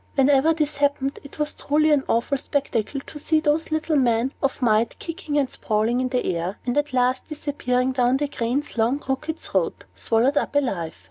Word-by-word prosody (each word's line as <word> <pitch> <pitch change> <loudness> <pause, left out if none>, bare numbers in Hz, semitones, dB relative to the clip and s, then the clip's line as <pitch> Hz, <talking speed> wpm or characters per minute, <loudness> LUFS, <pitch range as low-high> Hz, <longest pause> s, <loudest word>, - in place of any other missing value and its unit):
Whenever 275 +2 +4
this 305 -3 -1
happened, 280 -1 0
it 280 - -12
was 300 0 -1
truly 305 +2 +2
an 290 -2 +3
awful 235 +5 +1
spectacle 275 -2 -2
to 295 - -10
see 315 +1 +2
those 310 +1 +1
little 315 0 0
men 245 0 +2
of 275 -1 0
might 225 -2 +2
kicking 330 -3 -4
and 280 -2 +2
sprawling 225 +1 0
in 255 - -1
the 250 -1 -1
air, 175 +4 -3
and 245 - -1
at 290 -1 0
last 255 0 +1
disappearing 265 -4 -1
down 255 0 +2
the 290 +1 -1
crane's 250 0 -2
long, 235 +5 +2
crooked 290 +3 -3
throat, - - -2
swallowed 245 +6 +1
up - - 0
alive. 195 - -1
270 Hz, 190 wpm, -23 LUFS, 245-295 Hz, -, Whenever